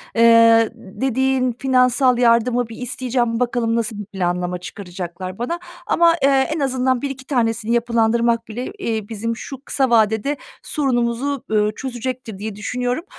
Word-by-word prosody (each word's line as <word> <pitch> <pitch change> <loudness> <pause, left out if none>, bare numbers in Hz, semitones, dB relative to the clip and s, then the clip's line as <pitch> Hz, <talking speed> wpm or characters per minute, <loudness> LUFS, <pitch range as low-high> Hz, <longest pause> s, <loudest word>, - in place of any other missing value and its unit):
eee, 230 -1 +6
dediğin 255 +4 0
finansal 255 0 +3
yardımı 240 0 +3
bir 225 - -9
isteyeceğim. 245 -2 -1
Bakalım, 240 -2 0
nasıl 225 -2 -2
bir 210 - -5
planlama 180 -2 -2
çıkaracaklar 185 0 -7
bana? 335 +9 -2 0.3
Ama, 335 0 +4
eee, - - +6 0.3
en - - -3
azından 260 -2 +1
bir 280 - -2
iki 265 -1 -8
tanesini 230 -4 0
yapılandırmak 235 0 +1
bile, 245 - -5
eee, 220 - -3
bizim 230 +1 -3
şu 265 +3 -8
kısa 265 -2 +1
vadede 220 +4 +2 0.3
sorunumuzu, 260 0 -1
eee, 210 -1 +2
çözecektir 250 -4 -5
diye 215 0 -5
düşünüyorum. 245 +7 -2
235 Hz, 140 wpm, -20 LUFS, 220-255 Hz, 0.3 s, eee